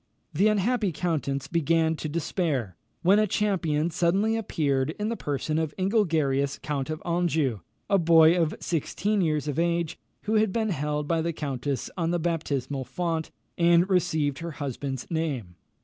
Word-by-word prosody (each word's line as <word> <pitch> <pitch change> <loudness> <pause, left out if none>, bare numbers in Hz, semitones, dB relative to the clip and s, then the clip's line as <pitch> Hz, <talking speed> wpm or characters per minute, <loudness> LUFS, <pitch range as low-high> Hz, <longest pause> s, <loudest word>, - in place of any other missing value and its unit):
The 195 +8 +3
unhappy 215 0 +1
countess 150 -5 -2
began 165 0 +2
to 155 - -4
despair, 150 - -1 0.3
when 195 +4 +5
a 215 - +3
champion 170 -6 0
suddenly 195 +7 +2
appeared 150 -9 0
in 210 +1 -1
the 230 - -1
person 150 - -2
of 160 -2 -2
Ingelgerius 160 -9 +1
count 145 -1 -2
of 155 0 -4
Anjou, 160 - +1 0.3
a 200 - +3
boy 165 0 +6
of 165 -3 +1
sixteen 200 +5 -1
years 155 -3 0
of 145 +1 -1
age, 170 -1 0 0.2
who 215 +1 +1
had 215 -2 +3
been 220 +1 0
held 150 -3 -2
by 165 0 +1
the 170 +1 -1
countess 140 -2 -3
on 165 -2 0
the 175 - +1
baptismal 150 -5 -2
font, 165 +4 -2 0.3
and 170 +1 +5
received 155 -6 +1
her 170 -1 -5
husband's 135 -2 -4
name. 145 - -2
165 Hz, 160 wpm, -26 LUFS, 145-180 Hz, 0.3 s, boy